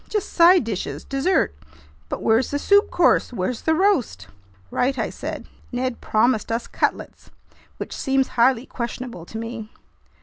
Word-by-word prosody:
"Just 420 -3 -2
side 350 0 +6
dishes, 180 -10 -4
dessert. 275 - +1 0.6
But - - -4
where's 225 +3 +3
the 285 - -1
soup 405 +7 +4
course? 350 - +3
Where's 225 +2 -3
the 320 - +2
roast?" 300 - +1 0.4
"Right," 265 +2 0
I - - -2
said. - - -6 0.3
"Ned 255 0 -3
promised 220 0 +1
us 230 +1 -1
cutlets, - - -3 0.5
which - - -6
seems 270 -1 +1
highly 245 +1 +2
questionable 235 -8 -6
to 220 - -7
me." 225 -1 -6
250 Hz, 145 wpm, -22 LUFS, 225-285 Hz, 0.6 s, side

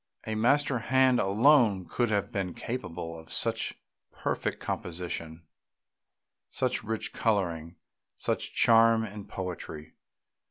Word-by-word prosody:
A 110 - -3
master 130 +4 +2
hand 130 +1 +3
alone 105 -1 +4
could 120 -2 0
have 100 -2 0
been 95 -3 -3
capable 85 -9 -5
of 80 - -13
such - - -1 0.3
perfect - - -2
composition, 85 -2 -5 1.1
such - - -1
rich 110 0 -3
colouring, 85 -6 -1 0.4
such - - -2
charm 115 0 +5
and 105 -1 -8
poetry. 85 -4 -6
105 Hz, 110 wpm, -29 LUFS, 85-115 Hz, 1.1 s, charm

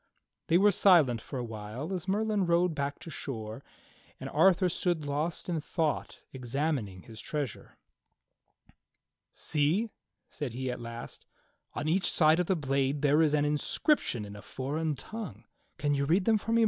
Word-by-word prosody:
They 170 - +5
were 205 +2 +5
silent 160 - +5
for 135 - -7
a 125 - -2
while 115 - -6
as 185 0 -4
Merlin 205 -1 +1
rowed 170 0 +3
back 140 -1 -2
to 165 - -8
shore, 115 -3 -6 0.6
and - - -6
Arthur 190 -1 +4
stood 175 -3 -1
lost 150 +4 -2
in 165 -3 -1
thought 155 -1 -2
examining 130 - -2
his 110 -2 -10
treasure. 145 -7 -5 1.5
"See," 165 +10 0 0.4
said 140 -6 -5
he 130 +1 -2
at 125 - -6
last, 115 0 -8 0.5
"on 150 - -2
each 180 +4 +2
side 155 +1 +4
of 180 - +1
the 190 - +2
blade 140 -1 0
there 145 +2 +5
is 150 -2 +3
an 145 -1 +2
in 150 0 +1
scription 145 - +1
in 100 0 -9
a 100 - -9
foreign 145 +8 -3
tongue. 220 - -7 0.3
Can 145 -1 +1
you 140 0 +1
read 180 +6 +2
them 220 -1 +4
for 225 - -4
me. 230 - +4
150 Hz, 170 wpm, -30 LUFS, 130-175 Hz, 1.5 s, They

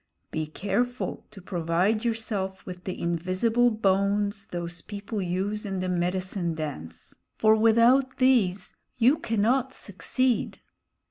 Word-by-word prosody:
Be 155 -1 -2
careful 205 +10 -2
to 200 -3 -13
provide 180 +6 0
yourself 215 -5 -3
with 180 -1 -9
the 185 - -4
invisible 185 +8 +1
bones 200 -1 +1
those 175 -1 -5
people 205 +2 -5
use 190 +4 -2
in 195 -2 -3
the 185 0 -2
medicine 180 -1 -1
dance, 145 - -7 0.2
for 220 0 +5
without 235 +4 +4
these 210 -8 +2 0.2
you 250 +6 +4
cannot 235 +4 +1
succeed." 245 +5 -1
200 Hz, 120 wpm, -27 LUFS, 180-225 Hz, 0.2 s, for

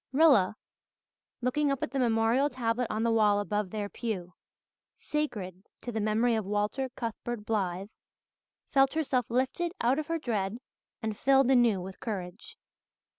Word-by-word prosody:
Rilla, 265 - +5 0.9
looking 280 +4 +1
up 275 - -2
at - - -3
the 275 - -1
memorial 235 +3 +3
tablet 245 -2 -1
on 215 +1 -1
the 230 - +2
wall 210 -2 +4
above 205 -1 -1
their 210 +1 -3
pew, 200 -6 -4 0.6
"sacred 205 - -3 0.2
to 245 - -5
the 220 - -2
memory 220 +3 +2
of 220 -1 0
Walter 210 +7 -1
Cuthbert 230 -2 -5
Blythe," 195 -3 -1 0.8
felt 270 -1 +4
herself 260 -7 0
lifted 265 +8 0
out 250 +5 +2
of 310 - -4
her 330 0 0
dread 215 -7 -2 0.5
and 220 -1 -2
filled 270 +2 +4
anew 235 -7 +4
with 190 +1 -8
courage. 215 - -6
230 Hz, 150 wpm, -29 LUFS, 210-265 Hz, 0.9 s, Rilla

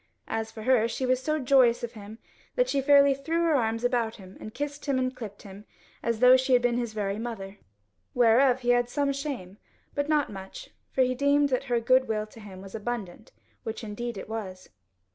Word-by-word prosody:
As 225 0 -3
for 220 - -9
her, 240 -2 +3
she 260 +3 -3
was 255 0 +1
so 305 +3 0
joyous 255 -4 +4
of 235 - -3
him 210 0 -11 0.4
that - - +2
she 280 - 0
fairly 280 0 +6
threw 325 +5 -1
her 330 -2 +3
arms 230 -3 0
about 240 -2 0
him 190 -2 -13
and 215 - -8
kissed 290 +3 -5
and 260 -2 0
clipped 210 -5 -9
him, 200 +1 -12 0.4
as 230 -1 -2
though 250 0 +8
she 260 0 +1
had 245 - +5
been 245 0 +1
his 235 -3 -3
very 205 -1 -2
mother. 205 -4 -6 0.6
Whereof 245 +2 +4
he 245 - -2
had 245 0 +3
some 280 +2 0
shame, 270 -10 -6 0.3
but 285 +1 -2
not 300 -5 +2
much, 190 0 -9 0.2
for 260 - +2
he 255 0 +1
deemed 285 +2 +2
that 255 0 -1
her 240 -3 +1
goodwill 230 -3 +2
to 215 +1 -16
him 195 -3 -11
was 195 - -11
abundant, 220 -3 -5 0.3
which 225 +1 -6
indeed 225 +1 -5
it - - -7
was. 195 -4 -6
240 Hz, 205 wpm, -27 LUFS, 215-270 Hz, 0.6 s, though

